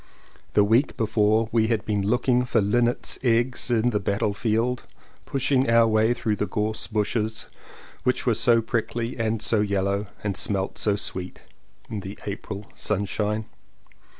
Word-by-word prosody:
The 105 - +5
week 115 +7 +2
before 110 0 +2
we 110 -1 +3
had 115 -2 0
been 105 -2 0
looking 125 +4 +2
for 125 - +1
linnets' 120 +4 +1
eggs 120 +1 +1
in 120 0 +2
the 105 - 0
battle 100 +1 0
field, 115 +3 0 0.5
pushing 135 -1 +1
our 115 0 +6
way 110 +2 +3
through 110 -3 -1
the 105 - -1
gorse 110 +1 -2
bushes 110 0 -2 0.5
which 125 0 0
were 120 - +3
so 115 +1 +3
prickly, 115 +1 -2
and 110 -1 0
so 110 - +2
yellow, 100 0 0 0.2
and 100 -2 -1
smelt 95 0 -1
so 105 -2 +2
sweet 95 -2 -6 0.4
in 110 - -4
the 95 +1 -8
April 100 0 -5
sunshine. 105 +1 -1
110 Hz, 150 wpm, -25 LUFS, 105-120 Hz, 0.5 s, our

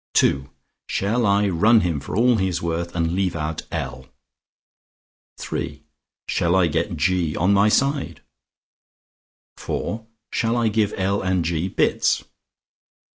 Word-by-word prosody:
"(II) 70 0 +1 0.4
Shall 110 +3 0
I 100 +1 +3
run 105 +6 +4
him 85 -6 -1
for 70 - -6
all 120 0 +4
he 95 -2 +1
is 90 - -2
worth, 85 +1 -3
and 85 -1 0
leave 95 -2 0
out 80 0 -3
L? 65 0 -5 1.5
"(III) - - -4 0.4
Shall 85 +2 +1
I 95 -2 +4
get 85 +3 -1
G 85 0 +1
on 90 +4 +2
my 100 +2 +4
side? 135 - 0 1.4
"(IV) 110 - -3 0.3
Shall 115 +1 0
I 115 -2 +2
give 105 -1 0
L 100 +1 0
and 95 -3 0
G 85 +1 -1
bits?" - - +1
95 Hz, 135 wpm, -22 LUFS, 85-105 Hz, 1.5 s, run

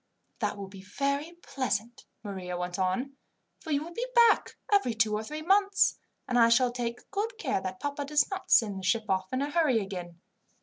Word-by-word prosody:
"That - - -1
will 200 -1 -6
be 190 0 -11
very 280 - -2
pleasant," 240 -4 -3 0.2
Maria 185 -4 -5
went 180 +1 -4
on; 245 +10 -1 0.4
"for 325 - -10
you 290 -1 +1
will 340 +2 -9
be 485 +7 -3
back 470 -2 +4 0.2
every 255 - +3
two 220 -1 +2
or 210 +1 -1
three 305 +7 -6
months, 395 +3 +3 0.3
and 245 -1 +2
I 230 0 +6
shall 245 +1 +4
take 240 -1 -5
good 430 +3 -2
care 270 - -1
that 185 0 -5
papa 285 0 -3
does 295 0 +2
not 380 -1 -5
send 210 -6 +4
the - - -9
ship 220 +3 +1
off 190 0 0
in 260 +2 0
a 290 - -3
hurry 300 -7 +3
again. 180 -4 -6
245 Hz, 205 wpm, -29 LUFS, 200-300 Hz, 0.4 s, I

